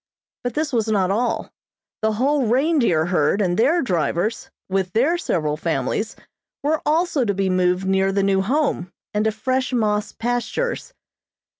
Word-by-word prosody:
But 245 -1 -3
this 300 -2 -1
was 225 -2 +1
not 195 -4 +2
all. 225 +2 -1 0.5
The 220 0 +1
whole 265 +3 +1
reindeer 250 - +2
herd 175 +1 +1
and 180 -4 +1
their 285 - +3
drivers, 205 +5 -1 0.2
with 190 -1 -1
their 270 +10 +3
several 155 - -1
families, 175 +7 -2 0.5
were 305 +2 +1
also 315 -2 +2
to 200 -4 0
be 195 -1 0
moved 180 0 +1
near 190 0 +2
the 200 0 +1
new 195 -1 +2
Home, 225 - 0 0.2
and 210 +1 +1
to 220 - +3
fresh 255 +5 -1
moss 210 -3 0
pastures. 245 - -2
220 Hz, 155 wpm, -22 LUFS, 190-260 Hz, 0.5 s, their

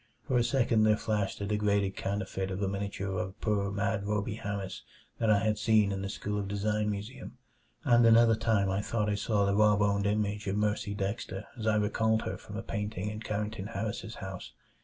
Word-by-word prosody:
For 130 - 0
a - - +3
second 120 -3 +2
there 110 0 +4
flashed 105 -3 -1
a - - -1
degraded 100 -1 +1
counterfeit 95 -1 -3
of 95 0 -3
a - - +1
miniature 95 -1 -3
of 95 +3 -5
poor 100 -2 0
mad 100 +1 -1
Rhoby 105 +1 -1
Harris 100 -2 -4 0.4
that 115 - +2
I 105 - +6
had 110 -1 +1
seen 105 -2 +4
in 95 0 -2
the 100 - -3
School 105 +1 -3
of 100 - -3
Design 105 +1 0
museum, 105 +7 -6 0.5
and 120 -4 +5
another 115 0 +7
time 110 -3 +2
I 95 +2 0
thought 105 -1 -1
I - - +1
caught 105 -1 +1
the 100 0 +1
raw 105 0 +5
boned 100 0 +2
image 105 0 -1
of 95 +1 0
Mercy 105 -1 0
Dexter 100 0 -3
as 110 -2 -4
I 110 - +4
recalled 110 +1 +1
her - - -3
from - - -8
a - - -4
painting 105 -1 -3
in 105 - -6
Carrington 105 -1 -3
Harris's 110 +1 -4
house. 95 -1 -7
105 Hz, 205 wpm, -30 LUFS, 100-110 Hz, 0.5 s, another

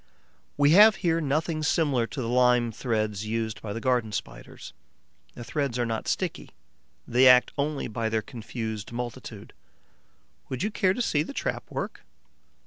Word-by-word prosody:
We 145 0 +4
have 210 +4 +8
here 165 -1 +2
nothing 155 +2 -1
similar 145 -6 +1
to 135 - -5
the - - -3
lime 125 -1 +3
threads 110 -3 -2
used 110 0 -3
by 105 - -6
the 115 - -4
Garden 120 -3 0
Spiders. - - -7 0.6
The 120 - -8
threads 140 -1 -2
are 120 - 0
not 115 -1 -3
sticky; - - -2 0.6
they 125 +2 +5
act 125 0 +6
only 145 0 -2
by 110 0 -2
their 110 -1 -1
confused 110 -2 -6
multitude. 120 0 -7 1.0
Would 130 +5 -3
you 210 - -1
care 185 -2 +1
to 250 - -1
see 150 -9 +1
the 165 - -5
trap - - -3
at - - -31
work? - - -5
125 Hz, 165 wpm, -26 LUFS, 115-150 Hz, 1.0 s, have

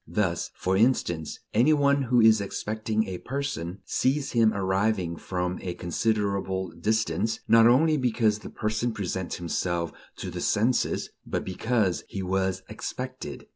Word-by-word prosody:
Thus, 85 0 -1
for 95 +1 0
instance, 95 - +1 0.2
any 125 +8 +5
one 140 -1 +3
who 125 -2 +2
is 110 -1 +6
expecting 110 +2 -2
a 90 -2 -5
person, 130 -10 -4
sees 135 +2 0
him 115 -2 +4
arriving 95 -2 0
from 90 +1 -3
a 90 -2 -4
considerable 95 0 -1
distance; 110 +4 0
not 115 0 +7
only 155 +6 +4
because 115 -5 +1
the - - -9
person 110 +2 -1
presents 95 -4 -3
himself 85 0 -2 0.2
to - - -6
the - - -5
senses, 115 +4 +1
but - - -3
because 100 0 0
he 95 - -5
was 95 0 -1
"expected." 130 - -6
105 Hz, 140 wpm, -27 LUFS, 95-120 Hz, 0.2 s, not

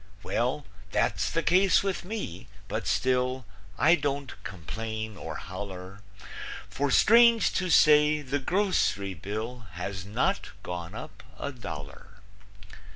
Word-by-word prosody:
Well, 125 +9 -1 0.3
that's - - +1
the 165 - -1
case 185 +2 +4
with 195 -2 -2
me, 150 - -5 0.2
but 110 - -3
still 125 0 +1 0.3
I 165 - +5
don't 140 -4 -1
complain 110 +4 -5
or - - -6
holler, 95 +1 -7 0.7
For, 145 +1 0
strange 230 - +6
to 185 -1 0
say, 150 -1 +6
the 140 +1 -1
groc'ry 160 - +1
bill 110 +5 -5
Has 95 +2 -4
not 120 - -1
gone 85 -1 -5
up - - -8 0.2
a 140 - -4
dollar. 85 - -9
125 Hz, 120 wpm, -28 LUFS, 100-155 Hz, 0.7 s, strange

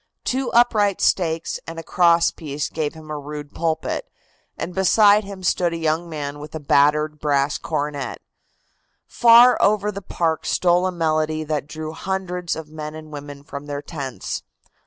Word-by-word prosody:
Two 260 0 -1
upright 215 -4 +3
stakes 165 -3 0
and 165 0 -7
a 165 - -5
cross 170 0 +3
piece 150 -2 -4
gave 155 -1 -3
him 155 -1 -10
a 150 - -3
rude 145 0 -8
pulpit, 165 - -2 0.5
and 180 - -4
beside 205 +3 +5
him 195 -1 -9
stood 175 -1 +1
a - - -3
young 165 +1 -1
man 145 -2 -5
with 150 +1 -9
a - - -3
battered 150 +1 +2
brass 145 -1 +1
cornet. 145 -3 -3 0.9
Far 240 +1 +6
over 210 0 +2
the 200 0 -7
park 165 -4 -1
stole 180 +1 +3
a - - -1
melody 155 -2 0
that 150 -2 -3
drew 155 0 -6
hundreds 180 0 -3
of 160 -1 -7
men 155 0 -6
and 155 -1 -10
women 145 -1 -8
from 140 0 -8
their 145 0 -4
tents. 135 -6 -5
160 Hz, 165 wpm, -22 LUFS, 150-185 Hz, 0.9 s, Far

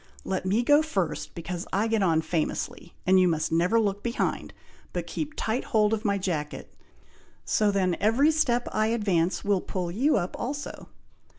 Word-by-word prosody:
Let 185 -1 -2
me 215 +6 +2
go 290 +4 +5
first, 190 - -3
because 175 +1 -5
I 200 +3 +1
get 225 -1 +1
on 165 -4 +3
famously, 160 +1 -3
and 185 +1 +5
you 185 - +5
must 160 -2 0
never 175 +8 +3
look 205 -2 0
behind, 235 0 -2 0.4
but - - -3
keep 310 0 -4
tight 225 +3 -1
hold 215 -1 +2
of 220 0 -1
my 200 -1 +2
jacket, 160 -6 -4 0.7
so 210 -1 +2
then 190 -3 +1
every 245 +9 +4
step 245 -6 +1
I 215 0 +1
advance 195 -6 0
will 200 -2 +2
pull 180 -2 -3
you 260 - +2
up 180 -2 -2
also." 285 +3 -5
200 Hz, 175 wpm, -27 LUFS, 175-230 Hz, 0.7 s, go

